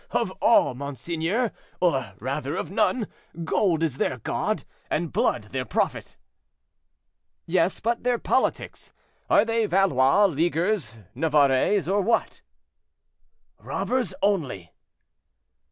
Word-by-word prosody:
"Of - - 0
all, - - +4
monseigneur; 165 - -2 0.3
or, 135 - +1
rather, 140 +6 -3
of - - -4
none; 230 +3 +1 0.4
gold 165 -1 +1
is 145 -5 -1
their 130 - -1
god, 115 - -2 0.3
and - - -2
blood - - 0
their - - -2
prophet." - - -2 1.3
"Yes; 175 +1 +1
but 235 +2 -1
their 245 -1 +2
politics? 260 - -1 0.4
Are 205 - +5
they 225 -1 +1
Valois, 185 -2 +4
Leaguers, 170 - 0 0.2
Navarrais, 150 +4 +2
or 200 +2 +2
what?" 225 +4 0 1.2
"Robbers 245 -8 -2
only." 140 - 0
170 Hz, 105 wpm, -25 LUFS, 140-205 Hz, 1.3 s, Are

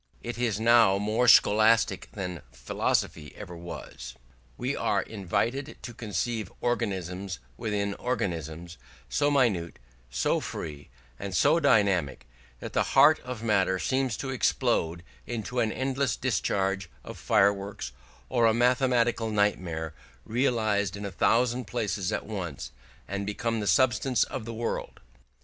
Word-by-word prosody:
It 120 0 -5
is 115 -4 0
now 115 -3 +5
more 110 +4 +1
scholastic 110 0 +5
than 90 -4 -5
philosophy 65 +5 -2
ever 85 - -8
was. 65 -7 -8 0.4
We - - -2
are - - +1
invited 110 - -2
to 120 - -7
conceive 110 -1 -3
organisms 95 -5 -2 0.2
within 100 +3 -2
organisms, 85 - -4 0.3
so 145 - +2
minute, 110 - +1 0.3
so 60 - +1
free, 75 -2 -7 0.3
and 95 -2 -4
so 150 - +4
dynamic, 100 - +2 0.4
that - - -7
the - - +2 0.2
heart 150 +3 +7
of 125 -3 -7
matter 95 -4 +2
seems 130 +6 0
to 135 - -4
explode 115 -10 0 0.2
into 120 +2 -3
an 110 -2 +1
endless 130 -1 -1
discharge 95 -6 -1
of - - -8
fireworks, 100 - +1 0.4
or 120 -3 +3
a 110 - +3
mathematical 120 -2 +2
nightmare 90 -6 0 0.3
realised 110 -5 0
in 100 - -6
a 100 - -4
thousand 125 +3 +2
places 105 -3 -2
at - - -2
once, 85 - -5 0.4
and 100 +1 -3
become 115 +2 -1
the 105 - -3
substance 125 -1 +3
of 125 -4 -5
the 115 - -5
world. 115 +1 -4
105 Hz, 130 wpm, -28 LUFS, 95-120 Hz, 0.4 s, heart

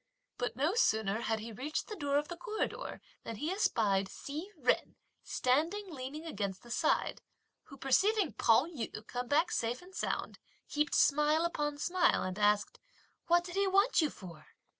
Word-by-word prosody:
But 245 -1 -2
no 295 - +1
sooner 220 - +2
had 225 -1 0
he 230 +1 -7
reached 270 +8 -3
the 430 - -6
door 285 -6 0
of 295 +1 0
the 345 - -6
corridor 435 +3 -4 0.2
than 230 - -5
he 300 - -2
espied 205 - +1
Hsi 305 - -6 0.2
Jen - - +2 0.3
standing 335 +10 0
leaning 280 +4 -6
against 200 - -4
the 240 - -11
side; - - +1 0.4
who 275 - -13
perceiving 385 - +2
Pao 230 +5 +4
yü 240 -9 -6
come 245 +1 -4
back 310 +6 +2
safe 235 +2 -1
and 365 +2 -15
sound - - -3 0.3
heaped 300 0 0
smile 300 +3 +4
upon 295 -4 -1
smile, 355 +3 +2
and 185 +2 -4
asked: 210 0 +2 0.5
"What 345 0 +4
did 350 0 -8
he 395 +1 +2
want 395 +3 +4
you 310 - +2
for?" 170 - -11
290 Hz, 170 wpm, -33 LUFS, 230-345 Hz, 0.5 s, Pao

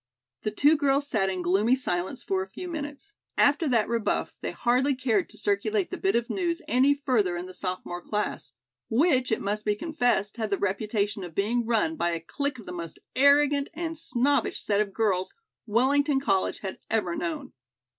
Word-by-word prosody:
The - - -1
two 290 +9 +4
girls 285 0 +2
sat 195 -7 +1
in 185 -1 -3
gloomy 200 +8 +3
silence 180 -8 -3
for 190 -1 0
a 190 - -6
few 360 - -7
minutes. 295 +3 -6 0.2
After 290 +3 +4
that 235 -5 +2
rebuff, 230 -2 -1
they - - -2
hardly 255 +3 +1
cared 255 - 0
to - - -11
circulate 410 -1 0
the 370 - -3
bit 390 - +1
of 235 0 +1
news 345 -3 -1
any 265 +3 +4
further 240 -11 +1
in 175 - -5
the 185 - -10
sophomore 180 -1 -4
class, 210 +3 -3 0.4
which, 260 0 +3
it 220 - +1
must 210 +1 -2
be 210 -1 +1
confessed, 245 - 0
had 220 -2 -2
the 200 - +1
reputation 205 +1 -1
of 170 -3 -9
being 225 +4 0
run 320 +8 +1
by 175 - 0
a 165 - -2
clique 280 - -3
of 225 - -11
the - - -7
most 170 -2 -6 0.2
arrogant 280 +1 +4
and 330 0 -3
snobbish 285 -3 +1
set 205 0 +1
of 205 -2 -2
girls 190 -3 0 0.3
Wellington 270 +6 +3
College 195 -8 0
had 190 -2 -5
ever 195 -6 0
known. 170 -2 -4
235 Hz, 190 wpm, -27 LUFS, 200-285 Hz, 0.4 s, two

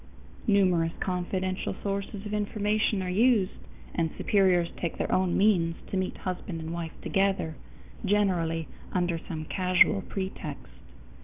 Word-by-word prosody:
Numerous 180 -5 +3
confidential 185 +1 -2
sources 200 +1 -3
of 210 - -4
information 210 -1 +1
are 180 - -3
used, 215 -1 +4 0.4
and 165 -1 +1
superiors 185 -4 +3
take 170 - -3
their - - -1
own 185 -1 +2
means 180 -5 +3 0.2
to - - -1
meet 185 -1 -1
husband 180 -2 -4
and 160 +1 -5
wife 170 -1 -5
together, 195 -5 +1 0.5
generally 180 -6 +1 0.3
under 175 -2 +1
some 155 -1 -6
casual 185 +3 +4
pretext. 190 -7 -5
185 Hz, 130 wpm, -28 LUFS, 170-200 Hz, 0.5 s, used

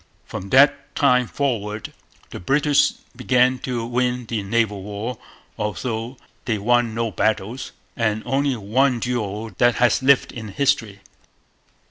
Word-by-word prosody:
From 95 +2 -7
that 135 +5 +4
time 125 -3 +3
forward 110 -6 -3 0.4
the - - -7
British 140 - +2 0.2
began 125 0 +2
to 120 -3 -3
win 125 0 -1
the 115 -2 -3
naval 105 -1 0
war, 105 +4 -5 0.4
although 115 +3 -3 0.3
they 110 -3 0
won 120 +2 +1
no 115 -1 -1
battles 110 +4 -1 0.2
and 110 -2 0
only 135 +1 +1
one 120 +4 +1
duel 110 -2 -3
that 120 -1 +4
has 120 0 +3
lived 135 0 +4
in 110 -2 -7
history. 105 -3 0
120 Hz, 130 wpm, -22 LUFS, 105-125 Hz, 0.4 s, that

